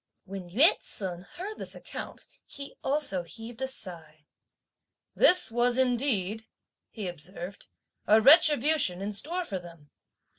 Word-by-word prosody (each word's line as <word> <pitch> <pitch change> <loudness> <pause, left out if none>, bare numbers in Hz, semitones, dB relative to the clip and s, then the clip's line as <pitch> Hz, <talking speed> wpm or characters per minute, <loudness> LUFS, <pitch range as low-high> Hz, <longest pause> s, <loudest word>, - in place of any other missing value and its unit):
When 190 -2 -8
Yü 280 - +5
ts'un 180 -3 -6
heard 385 - -9
this - - -5
account - - -8 0.2
he 280 0 -9
also 270 -10 0
heaved 225 +7 -11
a 265 - -1
sigh. 165 - -6 0.9
"This 365 -9 +5
was 240 +1 +1
indeed," 230 -5 0 0.4
he 210 -4 -6
observed, 175 +3 -7 0.4
"a 215 +1 +6
retribution 295 - +5
in 210 +1 -4
store 345 - -3
for 195 - -4
them! 170 -4 -15
220 Hz, 125 wpm, -28 LUFS, 180-275 Hz, 0.9 s, a